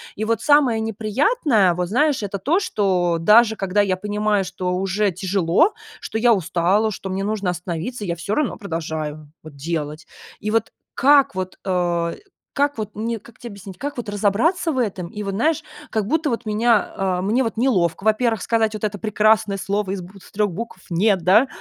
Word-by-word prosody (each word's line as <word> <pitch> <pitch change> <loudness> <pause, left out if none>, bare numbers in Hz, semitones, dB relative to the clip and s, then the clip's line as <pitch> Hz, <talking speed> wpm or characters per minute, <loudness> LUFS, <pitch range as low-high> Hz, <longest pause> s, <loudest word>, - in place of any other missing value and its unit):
И 215 - -3
вот 225 -1 0
самое 285 -6 +4
неприятное, 225 - +2
вот 180 0 -2
знаешь, 275 0 +2
это 200 -1 -4
то, 335 - +2
что 185 - +1
даже 220 +5 +5
когда 195 +1 +1
я 190 -2 0
понимаю, 210 0 0
что 180 0 -3
уже 195 +2 0
тяжело, 190 - +2 0.3
что 220 - -4
я 235 +1 +5
устала, 190 +4 +1
что 190 0 -6
мне 190 +1 -2
нужно 205 -4 -1
остановиться, 180 +6 -5
я 170 -1 -2
всё 170 +5 -4
равно 300 -4 -1
продолжаю 155 -5 -5
вот 155 -2 -12
делать. 150 +1 -4 0.3
И 210 - -3
вот 225 -1 0 0.2
как 280 -5 +4
вот, 185 0 -5
э, 175 -2 0 0.4
как 285 -2 +1
вот 210 -1 -5
мне 225 +1 -3
как 230 +2 -18
те 240 - -8
объяснить, 200 -3 -10
как 285 +2 -5
вот 225 -4 -4
разобраться 220 - +1
в 260 - -1
этом? 190 -7 -2
И 210 +3 -7
вот, 195 -1 -3
знаешь, 310 +7 +1 0.3
как 215 -2 -1
будто 310 +1 +1
вот 235 0 -3
меня 215 +1 +2
а 185 -2 0
мне 220 +7 +1
вот 225 - -3
неловко, 195 -9 +1
во-первых, 220 0 +2
сказать 220 -2 +1
вот 215 - -7
это 205 -1 -1
прекрасное 215 -1 +2
слово 200 0 -2
из 195 -2 -3
бутв 190 +2 -13
3 205 -2 0
букв 210 0 -7
"нет", 190 +3 +2
да, 215 +9 +5
205 Hz, 190 wpm, -21 LUFS, 185-230 Hz, 0.4 s, даже